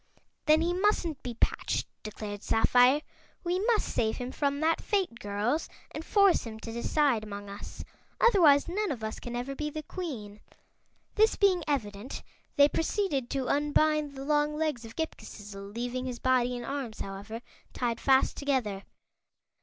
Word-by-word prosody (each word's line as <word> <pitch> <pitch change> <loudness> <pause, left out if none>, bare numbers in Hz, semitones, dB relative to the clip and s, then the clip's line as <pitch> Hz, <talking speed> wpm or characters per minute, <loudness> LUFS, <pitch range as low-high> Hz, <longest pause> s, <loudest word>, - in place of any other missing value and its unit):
"Then 310 +1 +6
he 345 +1 +1
mustn't 360 -6 +1
be 245 -2 -5
patched," - - 0 0.2
declared 210 -1 -6
Sapphire. 250 +6 +4 0.4
"We 355 +1 0
must 460 -3 +2
save 220 -1 0
him 250 +1 -4
from 280 0 0
that 325 +1 +2
fate, 380 - -1
girls, 210 +8 -1 0.2
and 310 - -6
force 400 0 +4
him 220 -2 -7
to 230 - -6
decide 235 0 +1
among 205 -1 -7
us. 200 - -8 0.4
Otherwise, 330 -11 +6
none 405 +3 -1
of 235 -6 -5
us 220 - -4
can 240 0 -6
ever 245 +3 -3
be 300 +2 -3
the 310 +1 -6
Queen." 240 - -6 0.7
This 435 +1 +4
being 375 -4 +3
evident, 225 -4 -3 0.3
they 285 -1 +7
proceeded 315 - -1
to 265 -2 -2
unbind 295 0 +2
the 270 0 -6
long 300 0 +2
legs 305 -7 -1
of 225 - -11
Ghip 320 0 -3
Ghisizzle, 200 -2 -9
leaving 245 +2 -3
his 250 -1 -4
body 250 -1 +2
and 240 - -6
arms, 270 -5 -4
however, 200 +4 -6 0.3
tied 235 -2 -2
fast 265 -1 +4
together. 255 -9 -1
265 Hz, 160 wpm, -29 LUFS, 225-310 Hz, 0.7 s, they